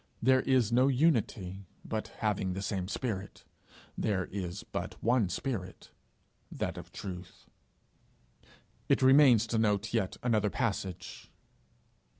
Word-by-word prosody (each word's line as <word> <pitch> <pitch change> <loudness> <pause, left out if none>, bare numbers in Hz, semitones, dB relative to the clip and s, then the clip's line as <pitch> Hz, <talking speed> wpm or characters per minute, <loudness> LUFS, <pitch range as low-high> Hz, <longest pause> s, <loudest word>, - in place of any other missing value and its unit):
There 130 +2 +4
is 125 -4 +2
no 125 +3 +4
unity 110 - +1 0.2
but 110 -1 -3
having 100 -4 -2
the 95 +2 -4
same 95 -2 -2
spirit. 105 -3 -4 0.5
There 95 -4 0
is 95 -1 -5
but - - -5
one 115 -4 +3
spirit, 95 -1 -5 0.6
that - - -3
of - - -10
truth. 90 -2 -8 1.4
It - - +3
remains 130 -4 +7
to 115 0 -1
note 105 0 +1
yet 105 -5 0
another 110 -4 +2
passage. 95 -6 -3
105 Hz, 120 wpm, -31 LUFS, 95-125 Hz, 1.4 s, remains